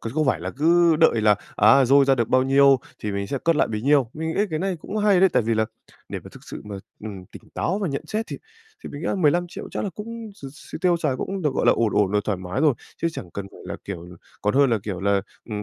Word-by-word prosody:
Còn 115 - -5
không 155 -1 0
phải 85 - +1
là 90 - -4
cứ 165 +1 +4
đợi 135 -8 +4
là, 105 -1 +5 0.2
à, 110 +6 +6
dôi 140 +2 +5
ra 135 0 +4
được 120 -3 -1
bao 130 0 +4
nhiêu 135 0 +5 0.2
thì 105 -1 -4
mình 100 0 -3
sẽ 140 - -3
cất 165 -2 +3
lại - - +2
bấy 105 0 -4
nhiêu. 140 -4 +3
Mình 160 +1 -4
nghĩ - - +1
cái 155 - -1
này 190 0 -1
cũng 215 - -6
hay 205 -3 +3
đấy, 190 - +6
tại - - +3
vì 115 +1 0
là 110 0 +2 0.4
để - - -4
mà - - -9
thực - - -14
sự - - -8
mà, 105 -1 -7 0.2
ừm, 100 -4 -8
tỉnh - - -13
táo 190 +4 -1
và 195 - -2
nhận 140 -2 -3
xét 220 +2 -3
thì - - -6 0.5
thì - - -5
mình 145 - -8
nghĩ 165 - -4
là - - 0
15.000.000 175 0 0
chắc - - -3
là 195 - -3
cũng 225 0 -7
x 140 - -15 0.3
x - - -7
tiêu 180 -2 +3
xài 150 -6 -1
cũng 195 +4 -4
được, 145 -3 0
gọi - - 0
là, - - +7
ổn 115 -2 0
ổn 100 -2 +3
rồi, 105 0 +2
thoải 100 -4 -1
mái 90 +8 -4
rồi, 150 -5 +4 0.3
chứ 165 - +2
chẳng 90 - -8
cần 100 -1 -6
phải - - -15
là, - - -5
kiểu 90 -3 -7 0.4
còn 105 +3 +1
hơn 140 -2 +4
là, 115 - +2
kiểu 100 -4 -5
là, 100 0 +2 0.3
ừm, 105 -1 -3
135 Hz, 290 wpm, -23 LUFS, 105-170 Hz, 0.5 s, là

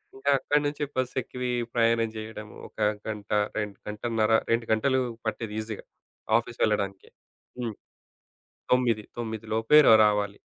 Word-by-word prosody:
ఇంకా 140 +1 0
అక్కడి 145 +2 +1
నుంచి 145 0 -2
బస్సు 130 -1 -1
ఎక్కి 125 - -12
వీ 125 - 0 0.2
ప్రయాణం 115 -1 +2
జేయడము, 110 -1 -8
ఒక - - -25 0.3
గంట 105 -2 -6 0.3
రెం 105 -1 -1 0.2
గంటన్నర 110 +1 -1 0.2
2 115 0 +2
గంటలు 130 +4 +2 0.3
పట్టేది 110 -1 -3
ఈజీ‌గా 110 -1 -6 0.5
ఆఫీస్ - - -5
వెళ్లడానికే. 100 -2 -1 0.5
హ్మ్. 115 -3 -3 1.0
9:00 120 -4 +3
9:00 110 -1 -4
లోపే 115 +7 +4
రా - - +9
రావాలి. 105 -1 0
110 Hz, 135 wpm, -27 LUFS, 105-125 Hz, 1.0 s, రా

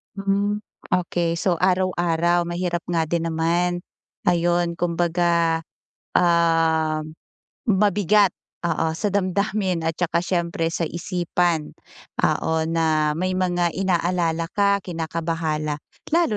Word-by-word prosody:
Hmm. 200 +1 0 0.3
Okey. 175 -1 0
So, 170 0 0
araw-araw 175 -2 +2
mahirap 175 0 -2
nga 170 -2 0
din 170 -1 0
naman. 170 +2 0 0.5
Ayun, 175 0 +1
kumbaga, 170 -1 +1 0.6
ah, 165 -2 +3 0.7
mabigat, 205 -1 +4 0.3
oo, 165 -1 +1
sa 210 - 0
damdamin 190 -2 0
at 165 +1 -2
saka 170 0 +1
siyempre 170 -2 -1
sa 165 -3 -1
isipan. 175 -2 -1 0.5
Oo, 160 0 +1
na 160 -2 +1
may 185 +3 -1
mga 175 -2 +1
inaalala 175 -3 0
ka, 200 0 +3
kinakabahala, 160 -3 -2 0.3
lalo 325 -10 +2
175 Hz, 105 wpm, -23 LUFS, 165-185 Hz, 0.7 s, mabigat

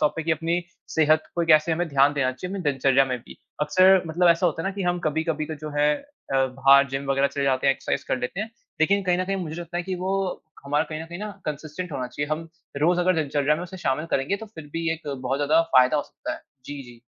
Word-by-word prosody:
तौर 150 - +3
पे 165 - -2
कि 165 - -2
अपनी 165 +2 0 0.4
सेहत 155 0 +4
को 170 - +1
कैसे 155 0 +5
हमें 175 +2 0
ध्यान 140 0 +4
देना 130 -3 +1
चाहिए 180 +9 -7
हमें 195 -2 -4
दिनचर्या 135 -2 +3
में 130 -2 -3
भी। 120 - -14 0.3
अक्सर 185 +5 +5
मतलब 175 +2 +2
ऐसा 170 +2 +4
होता 165 -1 -1
है 195 - -1
ना - - -3
कि 200 - -3
हम 175 0 0
कभी-कभी 155 0 -1
तो 160 - -5
जो 155 - -4
है 150 0 +4
अ, 285 - -11
बाहर 135 +2 +5
जिम 135 +1 -3
वग़ैरह 135 0 +3
चले 140 - -2
जाते 135 0 +1
हैं, 135 - +5
एक्सरसाइज़ - - -3
कर - - 0
लेते 125 +10 -3
हैं। 220 +1 -4 0.3
लेकिन 200 +5 +3
कहीं 180 -1 +1
न 185 - 0
कहीं 195 +1 -1
मुझे 170 -3 -5
लगता 175 0 -6
है 175 - -1
कि 185 +1 -3
वो 190 - 0 0.5
हमारा 145 +2 +1
कहीं 155 0 -6
न - - -6
कहीं 170 +1 -8
ना 210 +1 -5
कंसिस्टेंट 155 +4 -5
होना 130 -3 -3
चाहिए। 145 +4 -4
हम 160 +2 -2 0.3
रोज़ 175 +3 +3
अगर 185 +1 +3
दिनचर्या 150 -2 +1
में 170 - -5
उसे 180 +1 -8
शामिल 155 +5 0
करेंगे 135 +9 0
तो 220 - -9
फिर 160 - -8
भी 165 0 -1
एक 165 -2 -7
बहुत 130 +1 -2
ज़्यादा 150 +3 +4 0.2
फ़ायदा 130 +3 +6
हो 145 - +1
सकता 310 - -7
है। 325 - -11 0.2
जी, 145 0 -7
जी। 120 -2 -14
155 Hz, 265 wpm, -24 LUFS, 140-175 Hz, 0.5 s, फ़ायदा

